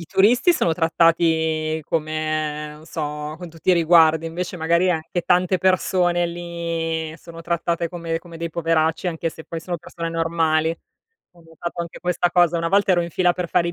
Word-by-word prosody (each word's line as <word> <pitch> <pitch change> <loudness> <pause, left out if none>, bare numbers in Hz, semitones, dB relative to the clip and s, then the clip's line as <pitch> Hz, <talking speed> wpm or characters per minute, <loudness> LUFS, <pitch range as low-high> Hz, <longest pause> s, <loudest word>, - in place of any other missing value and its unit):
i - - -7
turisti 240 - +4
sono 170 - +1
trattati 160 -1 +2
come 155 -1 -2
non 155 - -15
so, 150 -2 -4
con 175 +1 -9
tutti 165 +3 -1
i - - +6
riguardi, 165 -1 +4
invece 180 +2 -4
magari 170 +2 +2
anche 165 +1 -2
tante 180 +2 +2
persone 180 -1 +2
lì 170 -2 -3
sono 165 -1 -12
trattate 170 0 -1
come 165 -2 -3
come 170 -1 -12
dei 170 +1 -4
poveracci, 165 +1 0
anche 165 -1 -2
se 160 - -10
poi 165 - -6
sono 175 +2 -4
persone 170 0 -6
normali. 165 -1 +1 0.6
Ho 170 - -19
notato 170 +1 -6
anche 170 -1 -7
questa 175 0 0
cosa. 175 -1 +3
Una 165 0 -1
volta 200 +1 +3
ero 175 -2 +4
in 170 - -5
fila 180 0 +2
per 175 -1 -4
fare 170 0 +2
i - - -3
165 Hz, 185 wpm, -22 LUFS, 160-175 Hz, 0.6 s, i